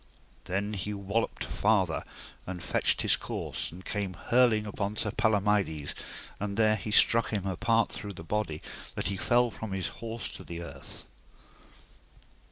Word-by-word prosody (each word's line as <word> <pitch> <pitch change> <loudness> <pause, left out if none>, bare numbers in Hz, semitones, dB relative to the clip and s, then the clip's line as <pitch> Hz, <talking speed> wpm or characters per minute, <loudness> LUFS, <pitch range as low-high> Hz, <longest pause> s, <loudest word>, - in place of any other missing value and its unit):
Then 100 +3 -1
he 105 +1 -3
walloped 100 +3 -1
farther, 100 -6 +2 0.4
and 90 -2 -5
fetched - - +2
his - - +5
course, - - -3
and 90 +3 -11
came 100 -3 -2
hurling 115 +1 +3
upon 105 0 -3
Sir 110 - -1
Palomides, 105 -9 +2 0.5
and 100 0 -3
there 110 -1 +5
he 105 0 -5
struck 115 +2 +6
him 100 -3 -1
a 95 -1 -1
part 115 +5 +2
through 100 -1 -5
the 85 - -9
body, 85 -4 -2 0.3
that 85 - 0
he 100 - -1
fell 120 +3 +3
from 110 -2 -6
his 95 -1 -1
horse 115 0 -4
to - - -8
the 85 0 -6
earth. - - -10
105 Hz, 160 wpm, -30 LUFS, 95-110 Hz, 0.5 s, struck